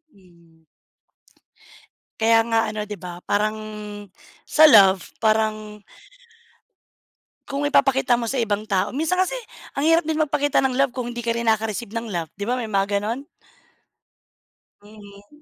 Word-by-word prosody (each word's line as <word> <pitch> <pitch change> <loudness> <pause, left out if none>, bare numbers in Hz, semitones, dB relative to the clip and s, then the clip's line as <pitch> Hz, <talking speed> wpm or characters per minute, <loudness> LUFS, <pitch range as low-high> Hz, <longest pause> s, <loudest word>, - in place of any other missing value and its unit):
Mm. 170 -3 -24 1.6
Kaya 225 0 +4
nga 225 0 +3
ano 215 - -3
'di 210 - -5
ba, 175 0 -9
parang 215 +1 +1 0.8
sa 310 0 +5
love, 195 - +5
parang 215 -1 0 1.7
Kung 280 +1 -3
ipapakita 270 -4 +2
mo 230 - -3
sa 270 - -3
ibang 210 0 -2
tao, 190 -1 0
minsan 315 +6 -1
kasi 375 - -4 0.4
ang 285 +3 -1
hirap 330 0 +4
din 315 0 -2
magpakita 290 -1 +1
ng 260 -2 0
love 275 -1 +2
kung 245 -1 -5
hindi 240 - -5
ka 230 - 0
rin 235 0 -3
nakaka-receive 220 0 -1
ng 230 -2 -4
love, 170 -3 -3
'di 200 - -6
ba 250 +3 -1
may 230 - -4
mga 200 0 0
gano'n? 230 +7 -4 1.6
Mhm. 205 +6 -16
220 Hz, 145 wpm, -22 LUFS, 205-265 Hz, 1.7 s, sa